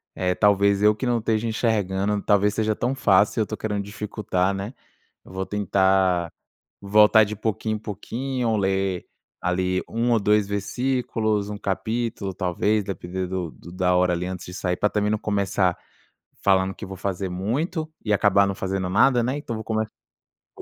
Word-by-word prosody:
eh, 90 0 0
talvez 100 -1 +3
eu 105 0 +6
que 130 - -4
não 120 -1 +1
esteja 110 0 0
enxergando, 105 -3 0
talvez 105 0 +3
seja 110 -1 0
tão 125 +3 -1
fácil 105 -4 +3
e - - +4
eu - - +3
estou 110 +1 -5
querendo 105 -2 -2
dificultar, 100 -2 -2
né. 100 +6 -5 0.5
Eu - - -14
vou 95 0 -3
tentar 95 -3 +2 0.5
voltar 105 +2 +6
de 105 +1 -5
pouquinho 110 0 -2
em - - -5
pouquinho, 115 +3 -3
ler 95 -2 0 0.4
ali 90 +1 0
1 120 +2 0
ou 115 - +4
2 105 0 +3
versículos, 110 -1 -1
1 105 - -5
capítulo 110 0 -2
talvez, 100 +3 0
depender 95 0 -4
do 90 -4 -3
do 85 - -13
da 90 0 +1
hora 90 0 +3
ali 90 +1 -2
antes 90 -1 -6
de 90 - -9
sair, 90 -1 -1
pra 105 - +2
também 105 0 0
não 110 - +1
começar 100 -3 0 0.7
falando 95 -1 +3
que 105 - -8
vou 95 -1 -8
fazer 95 0 -3
muito 145 - -2 0.2
e 105 - -1
acabar 100 0 +4
não 100 - -2
fazendo 95 -1 -2
nada, 120 +5 +4
né. 130 +4 -1
Então 120 -6 -5
vou 110 - -5
começar 110 -1 -1 0.5
com - - -16
100 Hz, 180 wpm, -24 LUFS, 95-110 Hz, 0.7 s, eu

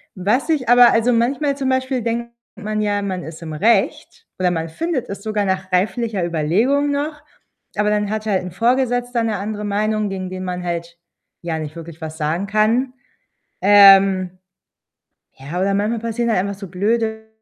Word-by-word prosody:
Was 210 - 0
ich 280 -7 0
aber 245 0 +7
also, 230 +2 +2
manchmal 270 +4 0
zum 265 -2 -1
Beispiel 260 -1 0
denkt 235 +1 -3 0.2
man 215 0 -3
ja, 205 -1 0
man 185 -3 -3
ist 160 +1 -9
im 160 -2 -6
Recht 205 +5 0
oder 180 -1 +2
man 165 -1 -3
findet 320 - -3
es 200 0 -6
sogar 215 -1 -1
nach 190 0 -2
reiflicher 200 +2 0
Überlegung 200 - +1
noch, 295 +1 -3 0.5
aber 210 0 +1
dann 210 -1 0
hat 215 0 -3
halt 200 -3 +1
'n 180 - -6
Vorgesetzter 245 +2 0
'ne 220 -2 -1
andere 210 +1 -4
Meinung, 210 +1 0
gegen 190 -1 -5
den 185 0 -6
man 180 -1 -4
halt 170 -1 -4 0.4
ja 165 -2 -3
nicht 155 0 -6
wirklich 165 0 -10
was 160 0 -6
sagen 165 +5 -1
kann, 225 +5 +1 0.7
ähm 195 -2 +6 1.1
ja, 150 +7 -5
oder 195 +1 +1
manchmal 210 +3 0
passieren 230 +1 -2
halt 220 - +2
einfach 200 +1 -4
so 195 - -7
blöde 220 +4 -1
210 Hz, 175 wpm, -20 LUFS, 185-235 Hz, 1.1 s, aber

